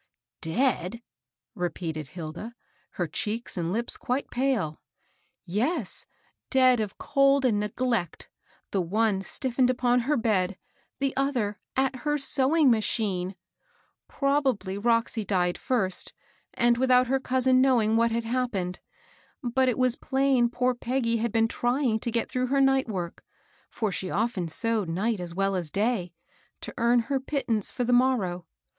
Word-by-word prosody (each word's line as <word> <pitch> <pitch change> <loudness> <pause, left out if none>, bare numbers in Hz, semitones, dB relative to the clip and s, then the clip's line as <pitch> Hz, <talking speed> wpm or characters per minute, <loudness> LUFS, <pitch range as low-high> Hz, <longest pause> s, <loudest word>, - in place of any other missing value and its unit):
^^ - - -61
Dead 200 +2 0
I - - -11 0.4
" - - -66
repeated 165 -3 -3
Hilda, 170 - -7 0.4
her 175 - -1
cheeks 215 +9 -3
and 170 -1 -2
lips 235 +4 0
quite 255 +3 -2
pale. 245 - -1 0.6
"Yes, 230 - -1 0.4
dead 255 -2 +5
of 210 -2 -3
cold 275 -1 +3
and 220 -5 +2
neglect, 210 -3 -2 0.2
— - - -35
the 195 - +1
one 200 +3 +1
stif 245 +5 -3
fened 255 -2 +4
upon 250 -1 +2
her 280 +5 +1
bed, 200 -5 +1 0.4
the 275 0 -1
other 245 -8 -1 0.2
at 265 0 +1
her 295 +3 -1
sewing 275 +1 +3
mar 225 -2 +3
chine 195 -5 -1
1 190 - -9 0.7
Probably 270 -9 0
Roxy 230 +1 +1
died 180 -3 +1
first, 195 -8 0 0.4
and 240 0 +3
without 255 -1 +4
her 265 +2 +1
cousin 255 0 +2
knowing 235 -5 +3
what 230 +1 +3
had 230 0 -1
happened; 225 -7 -2 0.6
but 255 +2 +2
it 245 - -1
was 255 -2 +3
plain 265 -4 +2
poor 250 +1 +1
Peggy 240 -1 -1
had 230 0 -1
been 225 0 +3
trying 240 -1 0
to 235 - -3
get 230 0 0
through 255 0 -1
her 275 +2 +1
night 270 -1 +3
work, 180 -5 -5 0.2
— - - -35
for 215 -3 -2
she 185 0 -3
often 210 -5 -1
sewed 215 +3 0
night 200 +6 -1
as 175 -1 -5
well 195 0 +1
as 175 -4 -2
day, 200 -1 0 0.3
— - - -37
to - - -7
earn 235 +1 +4
her 270 +4 -1
pittance 260 -6 0
for 250 - -2
the 245 +1 +1
morrow. 210 -9 +1
235 Hz, 165 wpm, -27 LUFS, 195-255 Hz, 0.7 s, dead